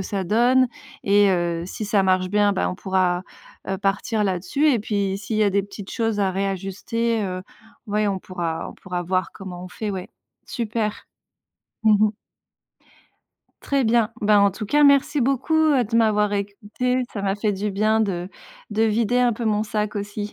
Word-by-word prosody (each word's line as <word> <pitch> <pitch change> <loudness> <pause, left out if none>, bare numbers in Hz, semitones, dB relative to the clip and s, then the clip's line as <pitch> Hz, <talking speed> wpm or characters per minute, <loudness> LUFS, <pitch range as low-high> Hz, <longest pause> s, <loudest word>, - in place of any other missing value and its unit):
ça 190 0 -3
donne 245 +6 +4 0.4
et 205 0 +5
heu, 170 -2 0
si 215 +3 -5
ça 205 -1 +2
marche 185 -1 +2
bien, 205 +1 +2
bah, - - 0
on - - -4
pourra, 185 -2 0 0.5
heu, 195 - -1
partir 205 +2 0
là-dessus 190 - 0
et 240 - +2
puis, 200 -2 -1
s'il 215 +2 -4
y 215 - +3
a 205 - +3
des 200 +1 +1
petites 200 0 -9
choses 225 -3 -1
à 195 - +2
réajuster, 195 +4 -2
heu, 185 -1 -4 0.4
ouais, 210 0 0
on 195 -1 -1
pourra 170 -3 -4
on - - -13
pourra 180 -2 -5
voir 185 +1 -1
comment 180 -2 -8
on 185 - -8
fait, 210 +3 -4
ouais. 190 -1 -5 0.4
Super. 225 -2 -3 0.8
Mmh 215 -1 +5
mh. 215 - +2 1.5
Très 275 -2 +1
bien. 225 -1 +2
Ben, 205 0 +5
en 200 0 +5
tout 195 +3 -6
cas, 295 +8 +2
merci 280 0 +4
beaucoup, 270 +5 0
heu, 305 -6 +4
de 230 +2 -6
m'avoir 210 -2 +3
écoutée, 205 +5 -2
ça 205 - -4
m'a 195 0 0
fait 210 0 0
du 205 +1 -2
bien 215 +3 +2
de 185 -4 -1 0.4
de 215 +2 +1
vider 225 +2 +2
un 245 -2 +3
peu 235 - -5
mon 215 -1 +1
sac, 210 -1 -2
aussi. 205 +1 -5
205 Hz, 185 wpm, -23 LUFS, 190-225 Hz, 1.5 s, et